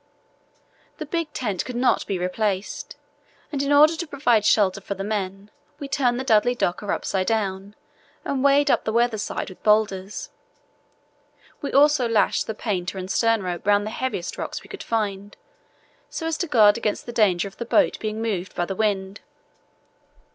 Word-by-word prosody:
The 310 - -5
big 330 0 -3
tent 210 -10 -2
could 250 - -7
not 250 +1 +1
be 195 - -1
replaced, 190 +2 -2 0.6
and 280 -3 -1
in 280 +1 -1
order 305 +3 +6
to 340 +1 -5
provide 255 -7 +2
shelter 200 -3 +3
for 200 - -5
the 195 - -5
men 200 -1 -4 0.3
we 280 - -6
turned 260 -4 +1
the - - -2
Dudley 245 0 +3
Docker 200 -1 -1
upside 185 -1 -1
down 200 -2 -2 0.5
and 275 -2 -1
wedged 280 +1 +4
up - - +2
the 220 - -2
weather 235 -1 +1
side - - -4
with 185 - -15
boulders. 210 -2 0 1.3
We 285 - -3
also 285 -2 +4
lashed 225 -2 +2
the 220 - -4
painter 190 -4 -3
and 185 0 -5
stern 225 -3 +2
rope 180 +1 -5
round 205 0 +3
the 215 - -4
heaviest 240 -9 -4
rocks - - -5
we - - -16
could 405 - -8
find, 205 -2 -3 0.7
so 325 - -5
as 325 -1 0
to 350 - -1
guard 220 -6 +5
against 210 -2 -2
the 240 - -6
danger 200 -6 +2
of 195 - -13
the 235 - -4
boat 290 +5 +2
being 215 +1 -3
moved 195 -5 -3
by 175 - 0
the 195 - -4
wind. 200 -2 -1
215 Hz, 180 wpm, -23 LUFS, 195-255 Hz, 1.3 s, order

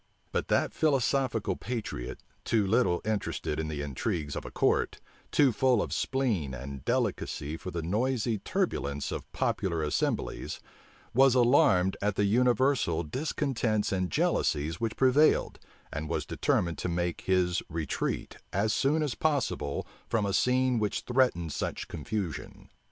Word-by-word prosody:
But - - -1
that - - +1
philosophical 130 -8 +1
patriot, 110 - -5 0.2
too 110 -3 +2
little 95 -3 +2
interested 105 -7 -2
for 80 - -1
the 75 -2 -3
intrigues 75 - -2
of - - -5
a - - -5
court, - - +1 0.3
too 140 -3 +4
full 125 0 +3
of - - -2
spleen 105 - 0
and 70 0 -7
delicacy 75 +3 -1
for 90 - -7
the 85 -2 -4
noisy 115 +4 0
turbulence 75 - -1
of - - -6
popular 85 -4 -1
assemblies, 75 - -1 0.5
was 135 +1 +5
alarmed 120 -7 +4
at 105 0 0
the 105 - +2
universal 125 - +2
discontents 120 - -1
and 95 -2 0
jealousies 75 +2 0
which 115 -1 -1
prevailed, 135 +4 +4 0.3
and 75 +1 -4
was 80 -3 -1
determined 85 -2 0
to - - -2
make 85 0 -1
his 90 -2 +1
retreat, 80 -1 -3
as 105 +3 +1
soon 150 +6 +2
as 145 -5 -1
possible, 135 - -1 0.2
from 110 -3 +1
a 100 - -1
scene 125 +1 +2
which 105 -1 -1
threatened 120 - +1
such - - -3
confusion. 100 -7 -5
105 Hz, 140 wpm, -29 LUFS, 85-125 Hz, 0.5 s, was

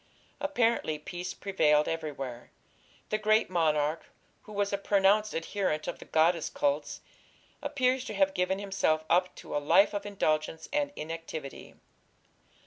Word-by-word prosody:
Apparently 235 - +1
peace 175 +4 -6
prevailed 150 -6 +2
everywhere. 140 -7 -5 0.6
The 215 - 0
great 215 -2 +2
monarch, 155 -2 +1 0.3
who 215 - -14
was 205 -1 -1
a - - +2
pronounced 200 +2 +3
adherent 165 -2 -1
of 175 - -4
the - - -11
goddess 165 +1 +2
cults, 145 +1 -1 0.6
appears 255 -1 +1
to 215 - -5
have 195 -1 +3
given 185 0 0
himself 190 -6 0
up 180 +2 +3
to - - -7
a - - +2
life 170 +8 +5
of 205 0 -3
indulgence 160 -5 -1
and 290 -1 +1
inactivity. 160 -2 -7
180 Hz, 135 wpm, -29 LUFS, 155-205 Hz, 0.6 s, life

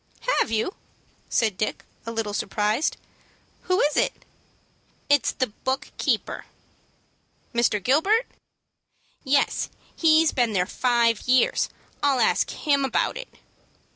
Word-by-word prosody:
"Have - - +1
you?" 225 - -1 0.6
asked 220 -5 +1
Dick, 215 - -3 0.2
a - - -2
little 225 -2 -3
surprised. 210 +7 0 0.7
"Who 365 +1 +3
is 295 0 +2
it?" - - 0 0.8
"It 285 -4 +4
is - - +2
the 255 - 0
book 260 +4 -4
keeper." - - -1 1.1
"Mr. 235 -2 +2
Gilbert?" 385 - +3 1.0
"Yes; 280 +1 +1 0.3
he 315 -1 +5
has 325 - +2
been 240 -4 +1
there 180 -2 +2
five 235 -1 +1
years. 255 -1 +3 0.3
I'll 280 -3 +2
ask 225 - +2
him 280 -3 0
about 270 - 0
it." - - -7
255 Hz, 125 wpm, -24 LUFS, 225-295 Hz, 1.1 s, he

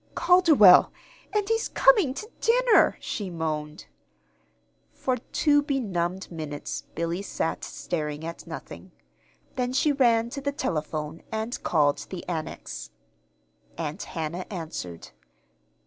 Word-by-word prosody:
"Calderwell 335 - +7 0.4
and 415 -1 0
he's 450 0 0
coming 415 - +4
to 430 - -6
dinner!" 480 -1 +4
she 200 -3 -4
moaned. 155 -3 -4 1.1
For 255 -1 -1
two 290 +4 +2
benumbed 190 - -2
minutes 155 -3 -5
Billy 170 +3 -2
sat 165 -4 -3
staring 150 -2 -4
at 170 0 -7
nothing. - - -9 0.6
Then 250 0 -1
she 295 +3 +3
ran 235 -4 +3
to 280 - -5
the 280 +1 -2
telephone 155 - -3
and 220 +2 -3
called 145 -3 +2
the 185 -2 -7
Annex. 60 - -5 0.9
Aunt 155 +3 -4
Hannah 170 +2 -4
answered. 155 - -6
185 Hz, 115 wpm, -26 LUFS, -, 1.1 s, Calderwell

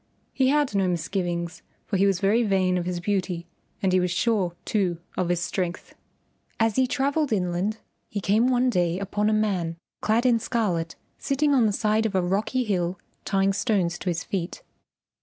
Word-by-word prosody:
He 265 - +2
had 290 -3 +2
no 195 -2 +2
misgivings, 175 0 -2 0.2
for 205 - -2
he 195 +2 +4
was 195 -2 +1
very 205 +4 +3
vain 190 -4 +2
of 175 - -4
his 180 -1 -2
beauty 185 -2 -1 0.4
and 190 -1 +2
he 185 - +5
was 180 0 +1
sure, 185 -1 +1
too, 185 -5 0 0.2
of 180 -2 -1
his 175 -1 +1
strength. 180 0 -3 0.7
As 225 -1 +2
he 260 -1 +3
travelled 280 +2 0
inland 185 +1 0 0.3
he 210 - -3
came 210 +5 +3
one 250 0 +3
day 175 -3 +1
upon 205 +2 0
a - - +2
man 190 -6 0 0.2
clad 225 +3 +2
in 240 -2 +4
scarlet 180 -9 -1 0.2
sitting 285 +1 +1
on 245 -5 +4
the - - +1
side 215 +1 +1
of 200 - -5
a 185 - +3
rocky 205 +8 0
hill 185 -4 -1 0.3
tying 195 0 +2
stones 190 -5 0
to 185 - -2
his 170 0 -2
feet. 180 -3 -4
195 Hz, 185 wpm, -25 LUFS, 180-225 Hz, 0.7 s, he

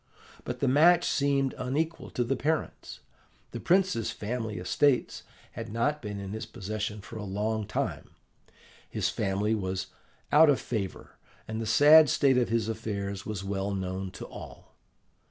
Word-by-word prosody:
"But - - -5
the 140 - +2
match 165 +6 +5
seemed 140 -2 +1
unequal 155 +6 -2
to 125 - +3
the 130 +3 0
parents. 155 +4 -3 0.5
The - - -5
prince's 185 - +2
family 110 -1 -4
estates 125 +9 +1 0.3
had - - -7
not 145 +7 0
been 105 -3 -5
in 100 -1 -6
his 110 0 -5
possession 105 0 -5
for 110 - -9
a 105 - -5
long 105 +2 -2
time, - - -3 0.8
his - - -1
family 105 +1 0
was 95 -3 -3 0.4
out 155 +1 +7
of 140 - +3
favour, 100 -6 -5 0.3
and 110 +1 -4
the 110 - -3
sad 150 +6 +7
state 135 -2 +3
of 120 - 0
his 115 -2 0
affairs 100 -3 -4
was 105 -3 -4
well 100 0 -2
known 95 0 -3
to - - -8
all. - - -11
110 Hz, 155 wpm, -28 LUFS, 100-140 Hz, 0.8 s, out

